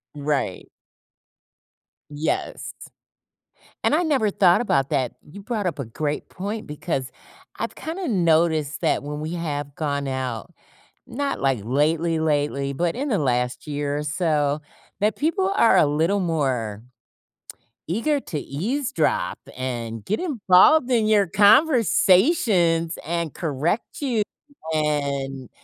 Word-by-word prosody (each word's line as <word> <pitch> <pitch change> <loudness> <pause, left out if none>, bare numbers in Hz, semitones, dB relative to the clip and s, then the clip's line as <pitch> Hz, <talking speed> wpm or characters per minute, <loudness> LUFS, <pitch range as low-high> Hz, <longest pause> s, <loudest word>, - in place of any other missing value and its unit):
Right. 145 -9 -2 1.4
Yes. 150 +2 -3 1.1
And - - +3
I 330 - +3
never 275 -10 +1
thought 180 -3 +4
about 140 - +1
that. 130 -5 0 0.2
You 200 +5 -10
brought 215 -3 -2
up 160 -5 -2
a 140 - -3
great 145 +6 -3
point 205 +4 -5
because 150 -3 -3 0.5
I've - - -3
kinda 335 +2 -5
noticed 160 - +2
that - - +1
when 150 +1 -5
we 155 +2 -4
have 145 -4 -4
gone 140 -2 -2
out, 130 -4 -4 0.6
not, 280 +2 -2
like, 135 -4 +1
lately, 160 +7 +1
lately, 145 -3 0
but 170 +4 -1
in 280 +3 -2
the 210 - +2
last 125 -1 -1
year 145 0 -2
or - - -3
so, 150 -2 0 0.4
that 210 +1 +1
people 375 +6 0
are 230 - +5
a - - +6
little 160 +7 +1
more 130 - -1 1.0
eager 235 - 0
to 155 - -4
eavesdrop 240 - -1 0.2
and 115 -4 -4
get 215 - -1
involved 260 - +4
in 230 -3 +3
your 210 -2 +4
conversations 200 - +4
and 170 -1 -2
correct 160 - -2
you, 240 -7 +1 0.5
and 140 -4 -1
160 Hz, 125 wpm, -23 LUFS, 140-210 Hz, 1.4 s, a